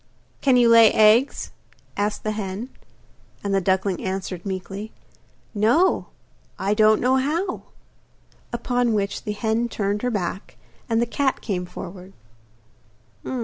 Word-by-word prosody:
'Can 265 -3 +4
you 240 -1 +5
lay 230 -1 +7
eggs?' 220 +5 +4 0.4
asked 205 +1 -2
the 215 - -1
hen. 210 +3 -5 0.7
And 200 -1 -1
the 195 - +2
duckling 190 0 0
answered 190 -1 -4
meekly: 195 +3 -5 0.6
'No; 235 - +2 0.5
I 195 +2 0
don't 215 0 +4
know 255 +2 +2
how.' 330 +8 -1 0.9
Upon 245 0 0
which 200 -1 -2
the 210 - -2
hen 225 +2 -1
turned 205 -1 -2
her 250 - 0
back, 195 -3 -4 0.3
and 230 0 +2
the - - +1
cat 265 +3 -1
came 180 -4 -3
forward. 185 +1 -9
215 Hz, 130 wpm, -23 LUFS, 195-240 Hz, 0.9 s, lay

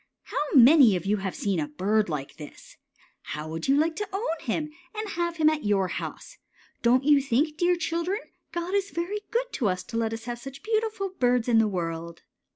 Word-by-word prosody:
How - - -4 0.2
many 260 -4 +8
of 180 - -3
you 205 +2 +2
have 190 -1 -4
seen 195 -4 -1
a 150 - -1
bird 200 +7 0
like 150 -3 -5
this? 150 -2 -12 0.5
How 150 +1 -6
would 160 +1 -4
you 275 +1 +4
like 320 +2 +2
to 415 -1 -3
own 390 -5 -2
him, 300 +5 -2 0.2
and 430 0 -4
have 340 -2 -2
him 310 -1 +4
at 310 -1 +2
your 195 -3 +1
house? - - -6 0.4
Don't 250 +2 +4
you 290 0 +5
think, 280 +4 +1
dear 350 +3 +2
children, 340 +5 -2 0.3
God 345 +2 -3
is 400 0 +1
very 360 +5 -3
good - - -1
to 225 -7 +1
us 185 0 -2
to 230 - -5
let 225 -1 0
us 225 0 -6
have 240 -1 -4
such 270 - -10
beautiful 435 -2 -1
birds 250 -9 +1
in 230 -2 +4
the 225 - +4
world? 170 -3 -4
265 Hz, 210 wpm, -26 LUFS, -, 0.5 s, many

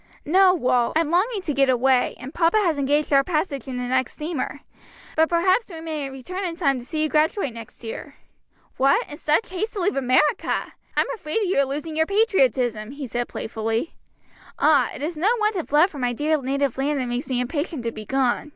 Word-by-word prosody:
"No, 370 +4 +5
Wal. 250 -6 +1
I'm 320 -1 +1
longing 400 +5 +1
to 300 - -2
get 275 -1 +3
away, 255 0 +2
and 265 +4 -8
papa 335 +4 +3
has 340 -8 +1
engaged 290 +2 +1
our 275 0 +6
passage 305 -5 -2
in 255 -1 -4
the 250 - -3
next 255 0 0
steamer. 300 -2 -4 0.5
But 320 0 +3
perhaps 370 +7 +2
we 330 -3 -8
may 310 -4 -4
return 270 +9 -6
in 345 -3 -3
time 275 -7 +1
to 240 - -10
see 310 +4 -2
you - - +2
graduate 305 - +1
next 230 +1 -11
year." 275 +5 -7 0.6
"What, 275 +1 +3
in 295 - -9
such 305 +10 +1
haste 425 +5 -3
to 410 - -4
leave 385 +3 +1
America! 275 +6 +1 0.2
I'm - - +4
afraid 370 -2 -2
you're 355 -8 +2
losing 295 +4 -5
your 320 0 +2
patriotism," 260 - +1
he 285 -1 -6
said 240 0 -3
playfully. 225 +5 -3 0.6
"Ah, 300 0 +4
it 275 - -7
is 320 +1 -3
no 365 +7 +2
want 425 0 +1
of 345 -6 -4
love 310 +6 +5
for 290 - -8
my 245 -1 0
dear 300 +4 0
native 275 0 -1
land 285 +1 0
that 255 - -1
makes 245 +2 -3
me 250 -2 0
impatient 290 +2 -3
to 230 - -2
be 215 -1 -9
gone!" 265 +2 0
290 Hz, 210 wpm, -23 LUFS, 255-335 Hz, 0.6 s, our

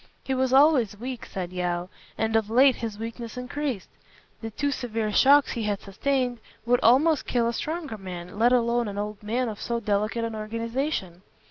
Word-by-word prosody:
"He 265 - -2
was 260 -1 +1
always 265 -6 +4
weak," 250 +1 -6
said 180 -1 -5
Yeo, 175 -1 -2 0.3
"and 220 0 0
of 220 -1 +2
late 260 +3 +5
his 225 -3 -5
weakness 230 +1 -6
increased. 250 -3 -3 0.5
The 225 - -4
two 285 +6 -1
severe 225 -5 -2
shocks 280 +6 +5
he 235 - -3
has 205 -1 -1
sustained 245 +4 -1 0.3
would 245 +1 +3
almost 280 +6 +4
kill 235 -2 +1
a 235 - -1
stronger 305 -4 -4
man, 180 0 -8
let 240 +2 +5
alone 240 -1 +2
an 200 -1 -5
old 210 0 -4
man 235 +4 -1
of 215 -2 -6
so 235 -1 -1
delicate 215 +2 -1
an 230 0 -3
organization. 230 - -3
230 Hz, 185 wpm, -26 LUFS, 210-255 Hz, 0.5 s, late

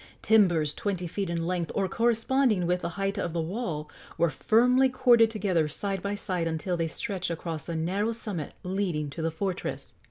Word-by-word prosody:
Timbers 175 -9 +4
twenty 190 -3 -2
feet 185 +2 -3
in 170 -1 -1
length, 175 -2 -1
or 195 -1 +1
corresponding 230 -2 +2
with 180 +1 +1
the - - -2
height 195 +1 -1
of 170 -4 -2
the 170 - -1
wall, 165 -3 -3 0.3
were 170 -2 +2
firmly 250 - +4
corded 240 -3 +5
together 190 -8 +1
side 195 +5 -2
by 200 +1 -2
side 185 -5 -2
until 165 +3 -1
they 165 -1 0
stretched 190 +2 -3
across 165 -1 -4
the 170 - -4
narrow 190 +7 0
summit 205 -9 -5
leading 180 -6 -2
to 160 - -6
the 165 - +1
fortress. 185 +3 -4
185 Hz, 185 wpm, -28 LUFS, 165-210 Hz, 0.3 s, corded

